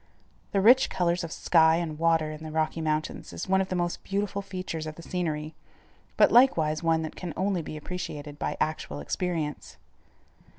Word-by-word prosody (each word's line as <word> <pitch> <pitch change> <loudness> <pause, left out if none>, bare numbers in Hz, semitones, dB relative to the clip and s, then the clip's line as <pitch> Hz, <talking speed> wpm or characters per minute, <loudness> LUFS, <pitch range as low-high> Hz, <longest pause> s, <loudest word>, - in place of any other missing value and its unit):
The 195 - +2
rich 250 +6 +6
colors 175 0 0
of 165 - -5
sky 160 -2 +4
and 160 -3 -3
water 165 -2 +2
in 155 +1 -8
the 155 - -6
Rocky 155 +1 -1
Mountains 155 0 -2
is - - -5
one 190 0 +3
of 190 - -3
the 185 - -1
most 175 -1 -2
beautiful 200 0 -2
features 185 -5 -5
of 155 - -6
the 170 - -11
scenery, 155 -4 -3 0.6
but - - +6
likewise 160 -12 +4
one 165 -1 +2
that 155 - -6
can 175 -3 -6
only 190 -1 0
be 155 0 -7
appreciated 150 -3 -6
by - - -2
actual 155 - -2
experience. 155 - -3
165 Hz, 180 wpm, -27 LUFS, 155-185 Hz, 0.6 s, rich